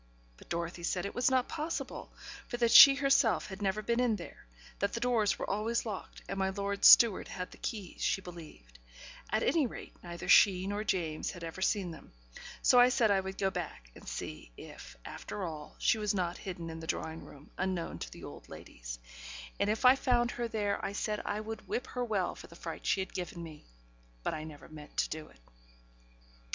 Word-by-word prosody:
But - - -17
Dorothy 170 +1 -3
said 180 +2 -1
it 200 - -4
was 245 +1 +2
not 260 -1 +2
possible, 320 +1 -4 0.4
for 240 - -4
that 235 -1 +2
she 275 +3 +11
herself 275 -6 +3
had 190 +1 -8
never 205 +2 0
been 235 +3 0
in 245 -3 +3
there; 170 - -10 0.3
that - - 0
the - - -2
doors 235 -5 +2
were - - -4
always 220 +4 -1
locked, 210 -4 -7
and 195 - -4
my 190 0 +1
lord's 200 +1 +2
steward 230 -5 +8
had 180 0 -6
the - - -14
keys, 205 -6 -5
she - - +1
believed; 160 - -12 0.5
at 215 +2 +1
any 315 -5 +3
rate, - - -9
neither 170 -1 -7
she 185 -2 +6
nor 205 +2 -2
James 165 -7 -1
had 180 -3 -8
ever 165 +3 -6
seen 190 -2 +1
them: 160 - -13 0.5
so 250 - +6
I 245 +1 +8
said 240 -5 +3
I 195 - +4
would 190 0 -5
go 195 -1 +1
back, 150 - -6
and - - -14
see 75 -6 -6
if, - - -11
after 205 - -6
all, 155 -4 -6
she 220 - +2
was 210 -1 0
not 175 -2 -1
hidden 175 -3 -6
in 160 - -7
the 160 - -8
drawing 160 0 -3
room, 145 +1 -14
unknown 185 -2 -2
to - - -6
the - - -11
old - - -10
ladies; - - -9 0.6
and 205 - +2
if 220 +4 0
I 255 +1 +9
found 245 -3 +2
her 240 -1 -3
there, 210 -3 -1
I 195 - -2
said, 210 +1 -2
I 210 - -2
would 220 +1 -7
whip 255 - -2
her 250 - -3
well 205 -6 0
for - - -12
the 170 - -15
fright 165 -1 -7
she 195 - +2
had 190 - -6
given 175 -1 -5
me; 155 -2 -11 0.6
but - - -1
I 155 0 -5
never 150 -2 -11
meant 150 -1 -12
to - - +1
do 155 0 -6
it. - - -20
195 Hz, 210 wpm, -32 LUFS, 170-225 Hz, 0.6 s, she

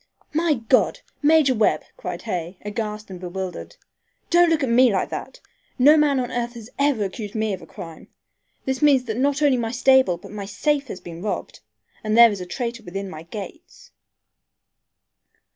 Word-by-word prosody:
"My 320 0 +2
God! 230 +1 +1 0.2
Major 300 -3 +5
Webb," 215 -3 +2
cried - - -6
Hay, 180 -4 -4
aghast 210 -1 -4
and 185 - -8
bewildered. 185 0 -6 0.6
"Don't 345 0 +5
look 320 -3 +1
at 265 - 0
me 245 +1 +5
like 190 - 0
that! - - -7 0.4
No 285 +4 +7
man 295 -3 +3
on 250 -1 -3
earth 240 0 -3
has 230 0 -10
ever 280 -6 +2
accused 205 +2 -6
me 220 -1 0
of 185 - -6
a 165 - -13
crime. 165 -4 -10 0.6
This 265 -1 -2
means 285 -4 +5
that 220 -3 -4
not 285 +2 +1
only 275 -3 +4
my 230 -2 -2
stable 260 -6 +4
but - - -13
my 205 -1 -6
safe 280 +8 -1
has 190 - -7
been 170 -1 -9
robbed, 210 +1 -4 0.4
and 215 +1 0
there 235 -1 +9
is 200 -2 -5
a 180 - -6
traitor 235 +4 -4
within 195 -1 -6
my 155 - -8
gates." 205 - -10
230 Hz, 180 wpm, -23 LUFS, 195-270 Hz, 0.6 s, there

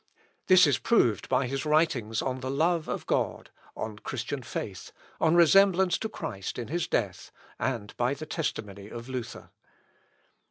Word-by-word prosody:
This 185 -2 +8
is 140 -4 +2
proved 120 - +2
by 135 - +2
his 135 +2 -3
writings 150 -8 +1
on 130 -1 -2
the 130 0 -4
love 160 +4 +1
of - - -4
God, - - -1 0.3
on 105 -1 -5
Christian 130 +5 -4
faith, 100 -5 -6 0.3
on 160 +1 +3
resemblance 190 +1 +5
to 220 - -3
Christ 95 - -5
in 120 -1 -5
his 170 +2 -1
death, 95 -5 -2 0.3
and 115 -6 -3
by 125 +3 +1
the 155 - -7
testimony 105 - -4
of 120 +2 -8
Luther. 125 -3 -6
130 Hz, 155 wpm, -28 LUFS, 115-165 Hz, 0.3 s, This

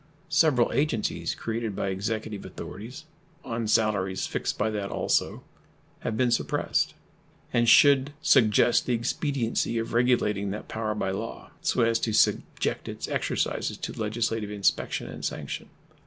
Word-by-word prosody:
Several 145 -5 +3
agencies 140 -7 0
created 115 -2 -3
by 100 - -1
Executive 105 +2 -3
authorities, 125 +10 -8 0.4
on 115 -2 -2
salaries 100 -4 +1
fixed - - -2
by 110 +1 0
that 100 -2 -3
also, - - 0 0.6
have 110 - -3
been 125 0 +2
suppressed, 120 - 0 0.6
and 120 0 +3
should 140 +2 +6
suggest 120 -8 +4
the 125 - +2
expediency 120 -1 -1
of 115 0 -3
regulating 115 -5 +2
that 105 +2 -5
power 110 -1 -2
by 95 -2 -1
law, 95 - -6
so - - +2
as 115 0 +2
to 110 - -1
subject 105 - +1
its - - -5
exercises - - -1
to - - -5
legislative 110 -1 -2
inspection 100 -1 0
and - - -8
sanction. - - -4
115 Hz, 140 wpm, -27 LUFS, 105-120 Hz, 0.6 s, should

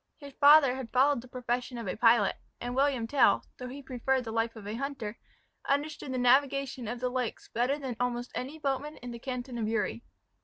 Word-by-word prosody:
His 280 -1 -11
father 285 -2 +7
had 260 -4 -6
followed 270 0 +3
the 255 - -14
profession 250 0 -3
of 230 - -5
a 185 - -2
pilot, 230 -3 +4 0.2
and 245 +1 -4
William 270 -3 +2
Tell, 270 +2 +3
though 250 - -5
he 275 +3 -8
preferred 260 0 0
the 225 - -6
life 225 +1 -1
of 220 -2 -10
a 210 - -4
hunter, 240 -4 -4 0.5
understood 285 -1 -1
the 260 - -2
navigation 265 0 +2
of 240 +2 -4
the 250 0 -1
lakes 250 -2 -3
better 250 +5 0
than 265 -5 -5
almost 245 0 -2
any 275 +5 -5
boatman 290 +1 -2
in 245 0 -8
the 235 - -7
canton 250 -1 -5
of 215 - -1
Uri. 225 +1 -1
250 Hz, 205 wpm, -30 LUFS, 235-275 Hz, 0.5 s, father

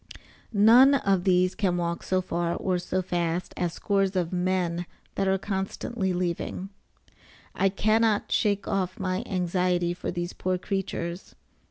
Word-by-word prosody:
None 235 +6 +7
of 195 -8 +1
these 185 -1 +3
can 185 -4 0
walk 170 -1 -2
so 185 0 0
far 170 -1 -1
or 185 -2 -1
so 185 +1 -2
fast 175 -1 -2
as 175 -2 -1
scores 195 -1 0
of 180 -1 -1
men 180 -1 0 0.3
that 195 - 0
are 190 0 +3
constantly 195 +1 -3
leaving. 180 +1 -3 0.8
I 195 - +2
cannot 215 +2 +2
shake 205 -1 +1
off 185 -2 -1
my 185 0 -1
anxiety 180 -1 0
for 175 - -5
these 175 0 -3
poor 185 0 -1
creatures. 180 -2 -4
185 Hz, 145 wpm, -26 LUFS, 175-195 Hz, 0.8 s, None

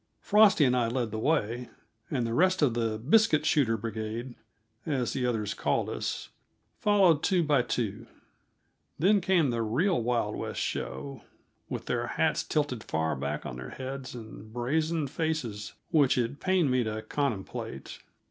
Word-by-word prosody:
Frosty 205 -7 +5
and 125 -1 +3
I 120 -2 +2
led 120 -1 -1
the 110 - -3
way, 120 -3 0 0.4
and 125 -4 0
the 115 - -2
rest 185 +5 +3
of 130 -5 +3
the 115 -2 -1
"biscuit 155 - +3
shooter 115 -7 +3
brigade," 115 +3 -4 0.5
as 130 -6 -1
the 125 -2 0
others 110 -4 -1
called - - 0
us, - - -4 0.5
followed 190 -7 +4
two 185 -3 +2
by 145 -4 +3
two. 115 -2 -3 0.9
Then 200 +5 +4
came 175 -7 +3
the 115 -1 -1
real 130 - +1
Wild 115 -3 0
West - - -4
show, 70 +1 -4 0.5
with - - -4
their - - -1
hats - - +1
tilted 145 -7 -1
far 80 -1 -1
back 70 +1 -3
on 60 - -5
their 65 0 -7
heads 130 0 -6
and 110 -2 -10
brazen 155 +7 0
faces 135 -8 -3 0.2
which 145 -7 +4
it 125 +3 -1
pained 185 -7 +2
me 125 -1 +2
to 110 0 -4
contemplate. 105 - -4
125 Hz, 155 wpm, -29 LUFS, 110-155 Hz, 0.9 s, Frosty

